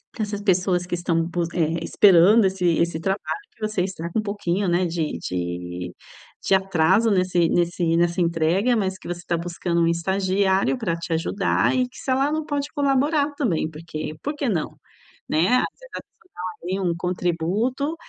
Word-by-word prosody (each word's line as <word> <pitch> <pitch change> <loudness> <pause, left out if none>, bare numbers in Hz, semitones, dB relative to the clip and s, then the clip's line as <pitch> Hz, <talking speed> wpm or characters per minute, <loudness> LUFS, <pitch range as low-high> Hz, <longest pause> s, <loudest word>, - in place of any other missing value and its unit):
que 230 - -4
essas 205 -1 -4
pessoas 180 -2 +1
que 175 - -2
estão 170 -1 0
bus 170 0 -2
eh, 165 -1 0
esperando 200 +4 +6
esse 190 -1 0 0.2
esse 170 -1 0
trabalho 195 - -2
que - - -28
você 215 -3 -1
está 180 -3 -5
com 220 - 0
um - - +1
pouquinho, 200 -2 -1
né, 175 +1 +2
de 165 -2 -2
de 90 0 -4 0.5
de - - +3
atraso 190 +3 +2
nesse 180 -3 +2
nesse 170 -1 +1
nessa 175 +1 +1
entrega. 170 +8 +2
Mas 190 -4 -1
que - - -12
você 175 0 -4
está 170 -1 -1
buscando 170 0 -2
um 165 - +3
estagiário 190 +5 +1
para 200 -9 -1
te 170 0 -4
ajudar 180 +8 +1
e 255 -1 +1
que - - -16
se - - -7
ela 275 +3 +2
não 310 0 -2
pode 285 -1 -2
colaborar 285 +1 +1
também. 180 - 0
Porque 155 -1 -6
porque 290 -1 -2
não, 165 -6 -1 0.6
né? 160 +3 +2
Às - - +2
vezes, - - -14
a - - -5
pessoa 355 - -32
dá - - -7 0.2
ali 185 +3 -2
um 175 -3 0
contributo, 180 - -1
180 Hz, 185 wpm, -23 LUFS, 170-210 Hz, 0.6 s, esperando